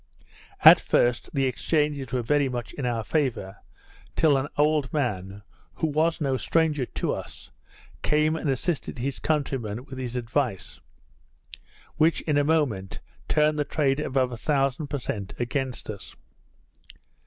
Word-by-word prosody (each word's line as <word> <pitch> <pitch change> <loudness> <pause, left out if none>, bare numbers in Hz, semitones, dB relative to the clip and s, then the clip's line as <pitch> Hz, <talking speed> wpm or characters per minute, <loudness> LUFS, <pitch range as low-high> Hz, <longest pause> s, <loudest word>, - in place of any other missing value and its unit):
At - - +10
first, 120 0 +1
the 135 -2 +1
exchanges 145 -1 0
were 125 -1 -1
very 140 +3 +2
much 120 -2 -5
in 135 -4 -3
our 115 -2 -1
favour, 115 -9 -1 0.6
till 155 -3 +4
an 135 +1 0
old 150 -2 +2
man, 100 -8 -2 0.3
who - - -1
was 160 +2 +1
no 135 -4 0
stranger 150 -3 +1
to - - -2
us, - - -7 0.5
came 155 +1 +2
and 160 -2 -2
assisted 140 +3 -2
his 130 +2 -3
countrymen 130 -7 -2
with 130 -2 -8
his 125 -1 -4
advice; 120 -3 -2 1.2
which, 160 +2 +3
in 150 -2 0
a - - +3
moment, 140 -12 0 0.3
turned 150 0 +2
the - - +3
trade 140 -1 0
above 130 -3 0
a 120 - -5
thousand 140 +2 0
per 145 - -3
cent, 100 -6 -5
against 130 +1 -3
us. 100 -3 -8
135 Hz, 145 wpm, -26 LUFS, 120-150 Hz, 1.2 s, At